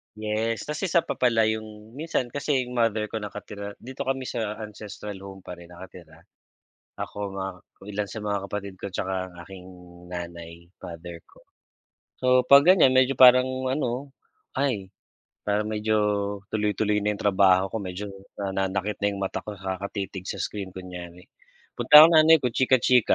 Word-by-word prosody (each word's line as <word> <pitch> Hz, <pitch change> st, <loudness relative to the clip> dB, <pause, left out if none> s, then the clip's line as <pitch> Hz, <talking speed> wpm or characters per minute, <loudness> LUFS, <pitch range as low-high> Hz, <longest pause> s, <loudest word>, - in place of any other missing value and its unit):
yes. 110 Hz, +1 st, -2 dB
Tas 150 Hz, 0 st, -5 dB
isa 175 Hz, -3 st, +2 dB
pa -, -, -5 dB
pala 115 Hz, -3 st, +3 dB
yung 110 Hz, 0 st, -4 dB
minsan 135 Hz, -4 st, -3 dB
kasi 140 Hz, -2 st, 0 dB
yung 125 Hz, 0 st, -5 dB
mother 110 Hz, -2 st, +1 dB
ko 110 Hz, -, -3 dB
nakatira 100 Hz, -1 st, -7 dB
dito 130 Hz, +2 st, -8 dB
kami 135 Hz, 0 st, -1 dB
sa 110 Hz, -4 st, -3 dB
ancestral 105 Hz, -1 st, -8 dB
home 95 Hz, -1 st, -11 dB
pa -, -, -9 dB
rin 85 Hz, -, -13 dB
nakatira. 85 Hz, -2 st, -13 dB, 0.7 s
Ako, 100 Hz, -1 st, -5 dB
mga 95 Hz, 0 st, -3 dB, 0.4 s
ilan 105 Hz, 0 st, -2 dB
sa 110 Hz, -, -6 dB
mga 100 Hz, -1 st, 0 dB
kapatid 100 Hz, -2 st, -5 dB
ko, 100 Hz, -, -4 dB
tsaka 95 Hz, 0 st, -2 dB
ang -, -, -18 dB
aking 95 Hz, -2 st, -11 dB, 0.5 s
nanay, 85 Hz, -1 st, -8 dB, 0.2 s
father 85 Hz, 0 st, -8 dB
ko. -, -, -20 dB, 0.8 s
So 130 Hz, -, 0 dB, 0.2 s
pag 140 Hz, +1 st, +8 dB
ganyan 175 Hz, -8 st, +6 dB
medyo 130 Hz, +1 st, +4 dB
parang 130 Hz, 0 st, +7 dB, 0.2 s
ano. 130 Hz, 0 st, -2 dB, 0.5 s
Ay, 115 Hz, -9 st, -1 dB, 0.6 s
parang 105 Hz, +1 st, 0 dB
medyo 110 Hz, 0 st, -1 dB, 0.6 s
tuloy-tuloy 105 Hz, 0 st, 0 dB
na 105 Hz, -, +2 dB
yung 100 Hz, -, -8 dB
trabaho 95 Hz, -1 st, +4 dB
ko, -, -, -4 dB
medyo 100 Hz, +1 st, -6 dB, 0.3 s
nananakit 95 Hz, +1 st, -2 dB
na 100 Hz, -, 0 dB
yung 100 Hz, -, -6 dB
mata 95 Hz, -, -2 dB
ko 105 Hz, -, -4 dB
kakatitig 95 Hz, 0 st, -5 dB
sa -, -, -5 dB
screen, 100 Hz, -3 st, -5 dB
kunyari. 90 Hz, -1 st, -9 dB, 0.5 s
Punta 150 Hz, +1 st, +9 dB
akong 165 Hz, 0 st, +7 dB
nanay 160 Hz, 0 st, +7 dB
ko 125 Hz, -, +2 dB
chika-chika 125 Hz, -1 st, +3 dB
105 Hz, 160 wpm, -25 LUFS, 95-125 Hz, 0.8 s, Punta